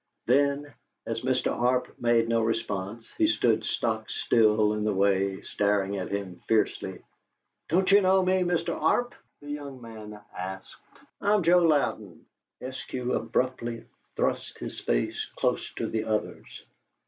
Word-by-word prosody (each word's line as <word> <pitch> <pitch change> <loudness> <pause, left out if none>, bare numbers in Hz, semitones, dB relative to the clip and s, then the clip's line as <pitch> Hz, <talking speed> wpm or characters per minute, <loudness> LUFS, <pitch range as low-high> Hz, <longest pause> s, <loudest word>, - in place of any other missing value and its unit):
Then, 140 +2 +2 0.3
as 115 0 -3
Mr. 130 0 +1
Arp 125 +1 +1
made 120 -1 +3
no 115 0 +2
response, 110 -1 -2
but 320 - +5
stood 335 - +2
stock - - -1
still 110 - +3
in 105 0 -2
the 105 - +1
way, 95 0 +2
staring 100 -1 0
at 95 - -4
him 100 -3 -4
fiercely, 100 -4 0 0.7
"Don't 185 +4 +3
you 200 +1 +7
know 190 0 +4
me, 185 0 +3
Mr. 175 -1 0
Arp?" 245 +10 +1 0.3
the 145 - -7
young 140 -3 -6
man 110 -3 -10 0.2
asked. 95 +1 -6 0.5
"I'm 205 -1 +3
Joe 175 +2 +6
Louden." 135 - 0 0.4
Eskew 130 -1 -3
abruptly 120 -2 -2 0.3
thrust - - -1
his - - -6
face - - -1
close - - 0
to - - -2
the 110 -1 -2
other's. 110 -1 -3
115 Hz, 140 wpm, -27 LUFS, 105-145 Hz, 0.7 s, you